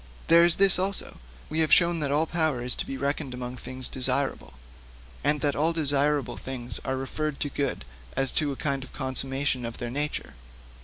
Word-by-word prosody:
There 170 +1 +8
is 175 -1 +5
this 195 -2 +5
also: 195 +1 -2 0.3
we 160 - -2
have 160 -1 +2
shown 170 -1 +5
that 140 -2 -1
all 150 +3 +2
power 155 -7 0
is 125 - +1
to - - -2
be 135 - -4
reckoned 140 -1 -2
among 125 0 -5
things 130 +1 -3
desirable, 125 - 0 0.7
and 145 +1 +2
that 145 0 +1
all 160 +3 +2
desirable 145 -3 +1
things 125 -4 -5
are 130 - -2
referred 145 +2 -3
to 145 - 0
good 140 - -2 0.3
as 135 -1 0
to 150 -2 +1
a - - -4
kind 135 -1 -2
of 130 - -13
consummation 135 0 0
of 115 -1 -5
their 120 -1 -5
nature. 145 +3 -3
140 Hz, 195 wpm, -27 LUFS, 130-155 Hz, 0.7 s, There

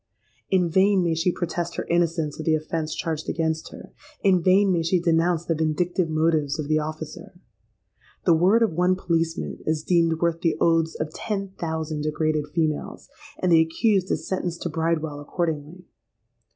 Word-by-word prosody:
In 185 -2 +3
vain 190 +2 +3
may 170 -1 +1
she 165 +3 +1
protest 175 0 -3
her - - -3
innocence 165 -3 0
of 155 - -5
the 160 - +4
offence 155 0 -3
charged 160 -2 -3
against 160 -1 -1
her: - - -12 0.3
in 185 -3 +4
vain 190 +3 +4
may 170 -2 +1
she 170 +2 +1
denounce 170 0 +1
the 165 - +1
vindictive 160 +3 0
motives 155 -2 +1
of 155 -2 -4
the 155 0 +2
officer. 155 +4 -7 0.9
The 170 - +5
word 190 +8 +4
of 220 - +1
one 180 +3 +2
policeman 165 -3 -2
is 155 -1 -1
deemed 165 -2 +2
worth 170 0 0
the 165 -3 +1
oaths 165 -1 +2
of 155 0 -4
ten 200 -3 -3
thousand 160 -4 -4
degraded 155 0 -1
females; 155 -1 -2 0.3
and 180 - 0
the 165 -1 +7
accused 190 +4 +1
is - - -2
sentenced 180 -2 -3
to 175 - -2
Bridewell 160 -2 -1
accordingly. 160 +2 -4
165 Hz, 170 wpm, -24 LUFS, 155-180 Hz, 0.9 s, the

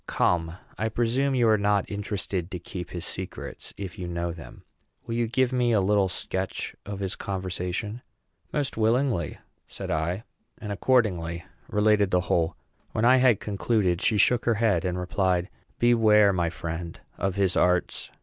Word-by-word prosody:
Come, 85 0 +1 0.2
I 110 - 0
presume 125 +5 +1
you 120 -2 +3
are 110 -1 +4
not 100 -1 +1
interested 100 -3 -3
to 95 - -4
keep 90 0 -7
his 85 -2 -5
secrets - - -6
if 100 0 -7
you 90 - -4
know 85 0 -2
them; 85 -1 -11 0.4
will 115 - -4
you 120 0 +1
give 130 +2 +1
me 120 -2 +2
a 105 - +4
little 100 0 +3
sketch 95 +1 -3
of 100 -1 -5
his 95 -1 -2
conversation?" 95 +3 -3 0.5
"Most 145 -5 -2
willingly," 115 - +1 0.3
said - - -6
I, 85 +6 -1 0.3
and 105 -2 -6
accordingly 95 -7 +1 0.2
related 105 -1 +3
the 90 -1 +2
whole. 85 -2 0 0.4
When 110 - +1
I 130 +2 +7
had 125 -5 +4
concluded, 100 -3 0
she 110 - +2
shook 120 +3 +3
her 115 - +3
head, 110 -2 +2
and 90 -1 -1
replied, 90 +1 0 0.3
"Beware, 110 -4 +5
my 85 -2 +1
friend, 85 0 -6 0.2
of 95 -1 0
his 95 -2 +2
arts. 90 0 +1
100 Hz, 165 wpm, -26 LUFS, 90-115 Hz, 0.5 s, I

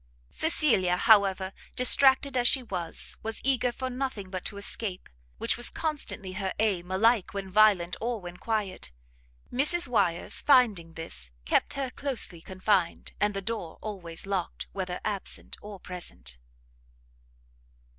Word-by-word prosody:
Cecilia, 235 - +2
however, 195 -3 +4 0.2
distracted 265 +1 +6
as 245 -1 +3
she 260 - +3
was, 180 -7 -4
was 225 0 -4
eager 255 -2 +2
for 260 +2 -4
nothing 250 -7 -4
but 185 -2 -4
to 200 - -4
escape, 200 -1 -3 0.3
which - - +1
was 240 - +2
constantly 290 - -2
her 190 0 -3
aim, 195 -5 0
alike 210 +2 +2
when 195 -1 -5
violent 195 -4 +4
or 235 0 -1
when 180 -1 -9
quiet. 205 - -2 0.6
Mrs 300 +6 +3
Wyers, 195 -8 +1
finding 215 - +4
this, 60 - -6 0.2
kept - - +2
her 270 -2 -3
closely 255 - -3
confined, 185 -1 0
and 205 -1 +1
the 195 - -3
door 195 -6 -4
always 180 -6 -6
locked, 195 -3 -3
whether 185 -2 -3
absent 205 -2 -3
or 205 -2 -9
present. 65 - -7
200 Hz, 135 wpm, -28 LUFS, 180-245 Hz, 0.6 s, distracted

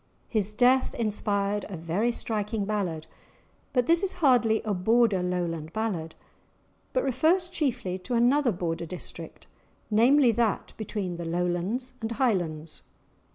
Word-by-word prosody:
His 210 -2 -2
death 255 +3 +3
inspired 205 -2 0
a 190 - -6
very 170 +9 0
striking 215 -2 -2
ballad, 185 -7 -2 0.7
but 250 -2 +2
this 335 +4 +3
is 390 -2 0
hardly 245 -9 +3
a 215 - -1
Border 210 +1 +3
Lowland 170 -3 -2
ballad, 185 -8 -3 0.8
but - - 0
refers 335 +7 +2
chiefly 230 - -2
to 240 +7 -3
another 245 +2 +3
Border 170 -2 -3
district, 180 +3 -7 0.5
namely, 245 +4 +5
that 225 -2 -1
between 200 -5 -4
the 170 - -5
Lowlands 180 +9 -1
and 225 +1 -3
Highlands. 170 - -1
210 Hz, 130 wpm, -27 LUFS, 180-245 Hz, 0.8 s, namely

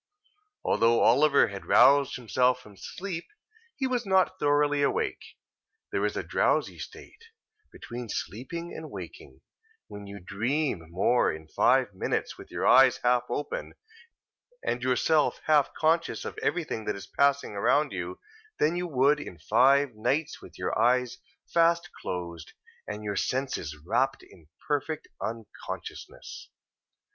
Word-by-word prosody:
Although 115 0 +3
Oliver 140 +4 +5
had 100 -1 -8
roused 140 0 +5
himself 125 +1 +1
from 105 -5 -16
sleep, 175 - -6 0.5
he 270 - -2
was 250 -2 0
not 190 -1 +2
thoroughly 145 0 +2
awake. 140 - 0 0.7
There - - -1
is - - -5
a - - -2
drowsy - - 0
state, 460 - -11 0.5
between 120 -1 -8
sleeping 170 - -5
and 160 -1 -7
waking, - - -10 0.4
when 100 0 -10
you 100 0 -8
dream 105 - -2
more 95 +8 +2
in 80 0 -9
five - - +3
minutes - - -2
with - - -13
your - - -3
eyes 130 0 +6
half 125 0 +3
open, 145 +4 -4 0.9
and 120 - -1
yourself 135 +5 +2
half 150 -3 +3
conscious 165 +2 +1
of - - -5
everything 160 -11 -2
that 105 - -1
is 100 0 -8
passing 140 +4 +1
around 145 +9 +2
you, 90 -1 -5 0.4
than 155 +3 +2
you 180 0 -2
would 140 0 +3
in 90 -11 -8
five 130 - +3
nights 140 +8 -1
with - - -14
your - - -2
eyes 125 +1 +2 0.3
fast 170 +1 +3
closed, 85 -3 -6 0.3
and 105 0 -6
your 100 -1 -3
senses 130 - -2
wrapt 130 +7 0
in 80 -4 -19 0.2
perfect 150 +1 -2
unconsciousness. 115 -1 -7
130 Hz, 135 wpm, -28 LUFS, 105-150 Hz, 0.9 s, eyes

